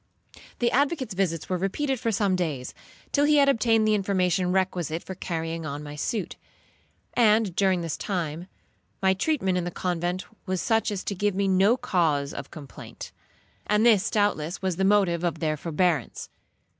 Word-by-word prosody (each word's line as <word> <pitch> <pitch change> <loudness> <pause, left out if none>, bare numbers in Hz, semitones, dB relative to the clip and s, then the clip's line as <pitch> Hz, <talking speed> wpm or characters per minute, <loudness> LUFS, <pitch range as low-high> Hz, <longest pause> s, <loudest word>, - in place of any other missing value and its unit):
The 240 -1 +1
advocate's 275 - 0
visits 175 -4 -1
were 185 -1 -1
repeated 265 +8 -1
for 230 -2 0
some 200 -2 +1
days, 150 -8 -3 0.4
till 285 0 +3
he 300 0 +4
had 280 -1 +5
obtained 225 -4 +3
the 215 - +3
information 185 -3 +1
requisite 180 -4 -1
for 190 - -6
carrying 165 -2 -4
on 145 -1 -5
my 145 0 -8
suit; 185 +4 -3 0.8
and 215 -5 +3
during 190 -3 +2
this 165 -2 -3
time, 175 -3 -3 0.6
my 190 0 +5
treatment 190 -5 0
in - - -2
the 175 - -2
convent 175 +1 -2 0.2
was 185 -1 -1
such 225 +3 +1
as 200 -3 -4
to - - -3
give 205 0 0
me 200 0 +1
no 195 +5 +4
cause 165 - 0
of 140 - -7
complaint; 150 -5 -10 0.6
and 210 +2 +3
this 220 -3 +4
doubtless 195 -6 0
was 185 -3 -2
the 190 - 0
motive 190 -4 +3
of 170 -2 0
their 155 -2 -1
forbearance. 160 -2 -1
185 Hz, 170 wpm, -26 LUFS, 170-210 Hz, 0.8 s, had